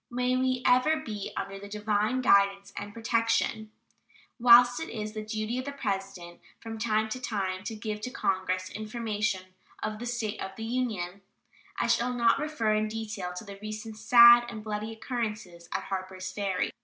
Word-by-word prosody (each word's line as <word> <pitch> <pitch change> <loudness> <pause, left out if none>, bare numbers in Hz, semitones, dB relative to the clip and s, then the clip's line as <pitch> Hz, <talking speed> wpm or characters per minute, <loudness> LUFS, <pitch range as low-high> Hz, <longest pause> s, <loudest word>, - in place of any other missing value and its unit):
May 250 +1 0
we 255 0 0
ever 255 +6 +4
be 215 -10 -5
under 195 0 -4
the 200 +1 -10
divine 210 +4 0
guidance 200 -3 +3
and 205 0 -6
protection. 230 -1 0 0.7
Whilst 245 +1 +7
it 325 - -5
is 215 -1 -5
the 215 - -4
duty 215 +3 -3
of 255 - -5
the 280 - -4
President 195 -8 -4 0.2
"from 225 -1 -7
time 220 -1 +1
to 255 +3 -5
time 190 -5 -2
to 225 - -4
give 210 0 -5
to 250 - -3
Congress 185 -4 -1
information 215 -2 -2 0.4
of 215 0 -3
the 240 - -5
state 235 -3 -3
of 190 0 -6
the 225 - -5
Union," 215 -7 -2 0.6
I - - +1
shall 250 +1 +1
not 235 +1 +3
refer 285 -8 0
in 215 0 +1
detail 215 -4 -5
to 180 - -6
the 200 -2 -10
recent 215 +1 -6
sad 235 +2 +8
and 220 -3 -7
bloody 215 0 -4
occurrences 215 -7 -5
at - - -2
Harpers 185 -1 -5
Ferry. 195 -2 -1
215 Hz, 175 wpm, -28 LUFS, 200-235 Hz, 0.7 s, sad